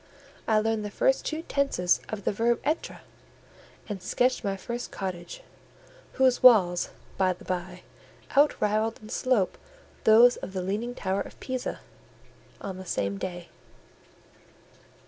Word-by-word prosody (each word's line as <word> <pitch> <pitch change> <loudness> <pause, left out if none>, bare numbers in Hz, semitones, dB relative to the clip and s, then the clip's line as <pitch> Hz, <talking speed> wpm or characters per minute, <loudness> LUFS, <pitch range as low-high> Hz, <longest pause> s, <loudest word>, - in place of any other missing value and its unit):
I 220 - +3
learned 220 0 +1
the 210 - -4
first - - +1
two 315 +1 -3
tenses 275 - +1
of 210 -2 -5
the - - +1
verb 230 +3 +1
Etre, 310 +3 -2 0.9
and 200 -3 -5
sketched 250 +7 +1
my 195 -2 -1
first 240 +4 -5
cottage 175 -3 -6 0.7
(whose 260 -1 +3
walls, 190 -8 +6 0.3
by 185 -1 +3
the 175 - -16
bye, 180 0 -4 0.5
outrivalled 220 -6 +2
in 215 - -11
slope 245 -8 0 0.4
those 235 +3 +7
of 190 - -8
the 185 -2 -2
leaning 215 +6 -3
tower 195 -2 -1
of - - -9
Pisa), 255 -1 -4 0.8
on 190 -2 -6
the 190 - -8
same 100 - -2
day. 175 -1 -6
215 Hz, 135 wpm, -27 LUFS, 185-245 Hz, 0.9 s, those